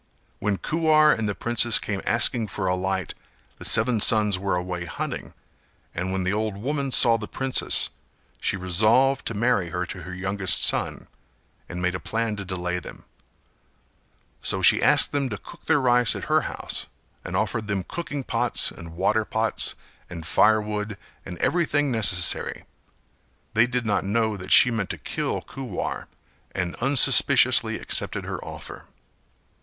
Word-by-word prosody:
When 105 -1 -1
Kuwar 155 - +3
and 110 -2 -3
the 100 - -3
princess 120 -1 +3
came 100 -2 -4
asking 115 0 +2
for 95 0 -5
a 90 - +1
light 95 0 -3 0.5
the - - -9
seven 115 +1 +4
sons 105 -4 +3
were 95 -1 -1
away 90 -1 -4
hunting 80 - -6 0.6
and 90 +2 -3
when 95 0 -2
the 95 +2 -1
old 105 -1 -2
woman 140 +5 -3
saw 115 -2 +5
the 105 - -6
princess 135 -1 +1 0.5
she - - 0
resolved 110 +9 +2
to 115 - -3
marry 105 -5 0
her 90 +2 -3
to 90 +1 -8
her 90 +2 -9
youngest 95 -1 +1
son, - - 0 0.6
and 90 0 -6
made 90 0 0
a 90 - -4
plan 115 -1 -2
to 100 - -5
delay 90 -1 -3
them; - - -12 1.4
so - - 0
she - - +5
asked - - +5
them 140 -2 -1
to 105 - -5
cook - - -15
their 160 -2 +2
rice 125 -3 +3
at - - -6
her - - +1
house - - -5 0.4
and - - -6
offered 110 -2 -2
them 100 -3 -2
cooking 145 - -6
pots 120 0 0
and 85 -1 -11
water 105 +4 +1
pots 110 +1 -1 0.3
and 85 -2 -8
firewood 105 +1 +1 0.3
and 90 - -7
everything 145 - 0
necessary; 95 -7 +1 0.9
they 115 +2 +4
did 125 -1 -3
not 105 -2 0
know 110 +2 0
that 90 -2 -9
she 125 - +7
meant 110 -4 -3
to - - -5
kill - - -4
Kuwar 125 -9 -6 0.5
and 90 -2 -2
unsuspiciously 135 +1 +5
accepted - - -1
her - - -6
offer. - - -9
105 Hz, 160 wpm, -24 LUFS, 95-120 Hz, 1.4 s, she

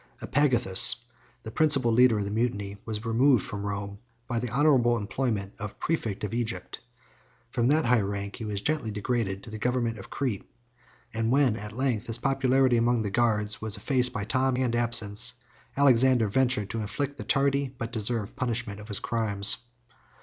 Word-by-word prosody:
Epagathus, 120 -9 +6 0.5
the 110 - -7
principal 135 -4 +3
leader 120 -1 +4
of 105 - -1
the 100 - -5
mutiny, 105 -3 -2
was 110 0 -5
removed 120 0 +3
from 100 -1 -6
Rome, 100 0 -5 0.3
by 120 -2 -2
the 125 +1 -4
honorable 125 -3 +3
employment 105 -2 -3
of 105 0 -7
præfect 115 -13 -3
of 105 - -4
Egypt: 120 -1 -4 0.7
from 120 0 0
that 155 +3 +2
high 120 -1 +3
rank 100 0 -5
he 120 - -7
was 105 -2 -4
gently 150 -5 -1
degraded 105 -2 -3
to 110 - -11
the 110 - -7
government 120 -2 -1
of 95 - -11
Crete; 125 -8 -4 0.6
and 115 +1 -1
when 135 -4 +3
at 105 0 -8
length, 125 -4 -1
his 115 0 -1
popularity 130 -1 +2
among 120 0 +1
the 100 - -3
guards 110 -2 0
was 110 -1 -2
effaced 125 +3 0
by 105 - -4
time 130 +3 0
and 125 -2 0
absence, 120 0 0 0.4
Alexander 130 -4 +4
ventured 125 -3 0
to 115 - -3
inflict 140 +7 -4
the - - -5
tardy 140 0 +1
but 115 -3 -7
deserved 110 -1 -1
punishment 120 -4 -3
of 105 - -11
his 105 -3 -2
crimes. 105 -3 +2
115 Hz, 175 wpm, -27 LUFS, 105-130 Hz, 0.7 s, Epagathus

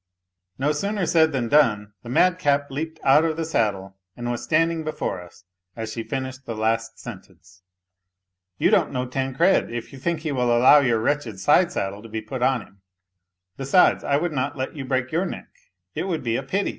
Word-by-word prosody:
No 145 +3 +1
sooner 200 +5 -1
said 160 -1 +3
than 130 -4 -1
done, 105 -7 +2
the 120 - -10
madcap 145 -2 +2
leaped 160 +3 -5
out 140 +3 +5
of 160 -1 -1
the 165 - -2
saddle 100 -9 -1 0.2
and 120 0 -3
was 120 - -4
standing 165 +1 +1
before 155 -11 -3
us 90 +2 -16 0.3
as 110 -1 -5
she 115 - -4
finished 130 +1 -5
the 115 - -4
last 115 +1 -1
sentence. 90 -5 -12 0.5
" 90 0 -60
You - - +2
don't - - +3
know 125 0 -2
Tancred, 135 +8 +1
if 120 +2 -6
you 135 - -10
think 165 +3 -2
he 155 -2 -3
will 125 -3 +2
allow 130 +5 +7
your 125 -5 +2
wretched 120 -4 -1
side 170 - +4
saddle 100 - -3
to 115 - -12
be 110 +1 -3
put 115 +4 -6
on 130 -3 +2
him! 100 -1 -22 0.8
Besides, 140 +7 +3
I 140 - +2
would 170 +3 -1
not 140 +1 -2
let 130 +3 -4
you 140 -3 -5
break 130 -1 -1
yoiir 170 +6 -1
neck, - - -8 0.4
it - - -3
would 165 -6 -2
be 115 -1 0
a - - -1
pity 190 +10 -1
130 Hz, 205 wpm, -23 LUFS, 115-155 Hz, 0.8 s, allow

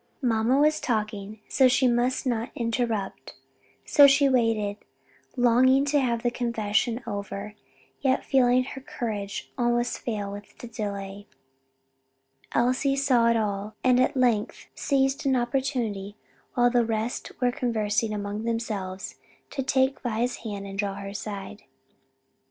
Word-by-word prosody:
Mamma 235 +1 +2
was 305 +2 +3
talking, 215 -2 -3 0.2
and 260 -1 +7
she 255 +1 +3
must 245 +3 +1
not 235 -2 -1
interrupt, 230 -4 -2 0.5
so 285 -1 +7
she 280 0 +5
waited, 225 -5 +1 0.6
longing 260 +2 +4
to 290 0 +2
have 235 -3 0
the 240 - +1
confession 235 0 -1
over, 200 -1 -5 0.5
yet 265 -2 +1
feeling 255 -1 +4
her 265 +1 -8
courage 215 -7 -5
almost 240 0 +1
fail 205 -4 -3
with 205 0 -10
the - - -9
delay. 200 -2 -5 1.2
Elsie 255 +3 +2
saw 260 -4 +3
it 235 0 +3
all, 210 0 -2
and 250 -1 +4
at 255 +1 +2
length 235 -5 +1
seized 270 0 0
an 265 - +3
opportunity 240 -5 -1 0.4
while 245 0 +4
the 240 -1 +3
rest 225 +1 -3
were 250 -1 +2
conversing 220 -3 0
among 205 +1 -4
themselves, 210 -5 -3 0.3
to 275 - -2
take 265 0 +1
Vi's 240 0 -1
hand 205 -3 -6
and 195 0 -7
draw 200 -1 -1
her 200 - -7
to 200 - -6
her - - -8
side. 205 0 -6
235 Hz, 140 wpm, -26 LUFS, 210-255 Hz, 1.2 s, and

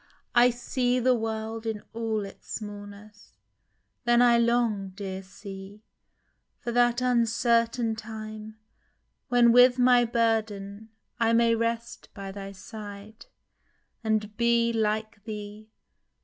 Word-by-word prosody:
I 245 +1 +6
see 245 +1 0
the 255 +1 +3
world 225 -1 -3
In 215 -2 -3
all 225 -2 -2
its 195 - -13
smallness. 205 0 -9 0.7
Then 240 -1 +4
I 240 -1 +5
long, 230 -5 +1
dear 190 -2 -5
C.... 195 +2 -11 0.7
For 240 - -5
that 240 0 +3
uncertain 235 -1 +2
time, 215 -1 -8 0.7
when 240 -1 +5
with 245 +1 +6
my 245 -1 +5
burden 220 -3 -1 0.3
I 230 0 +3
may 230 0 +4
rest 230 +1 -3
by 195 -2 -6
thy 195 0 -7
side, 205 +1 -10 0.8
and 215 -1 -1
be, 235 0 +2
hke 215 -1 -1
thee. 210 0 -8
225 Hz, 115 wpm, -27 LUFS, 210-235 Hz, 0.8 s, I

